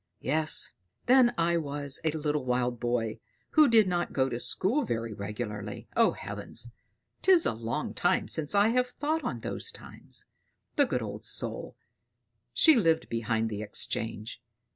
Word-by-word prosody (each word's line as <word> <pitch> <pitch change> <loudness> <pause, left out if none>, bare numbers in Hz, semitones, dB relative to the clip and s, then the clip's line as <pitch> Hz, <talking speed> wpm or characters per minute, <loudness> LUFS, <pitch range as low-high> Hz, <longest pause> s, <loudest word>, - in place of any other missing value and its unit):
Yes, 155 +3 +2 0.3
then 250 -1 +6
I 170 0 +2
was 145 -3 -1
a 160 - +2
little 150 -2 -1
wild 125 -1 0
boy, 120 -2 -1 0.3
who 310 -2 +6
did 220 -3 +6
not 175 -1 -1
go 130 -1 +2
to 120 -1 -3
school 190 - +1
very 115 - -3
regularly. 105 0 -5
O - - +4
heavens! 105 +4 -5 0.5
'tis 370 -3 +6
a - - +1
long 115 +1 -3
time - - +1
since 155 +4 -1
I 205 +2 +5
have 250 +2 +2
thought 300 +5 -2
on - - -3
those - - -3
times. 460 - -9 0.5
The - - +4
good - - -1
old - - -6
soul! - - -4 0.8
She 320 -2 +6
lived 165 -8 +2
behind 115 -1 0
the 105 0 -4
Exchange. 110 +2 -3
140 Hz, 155 wpm, -29 LUFS, -, 0.8 s, then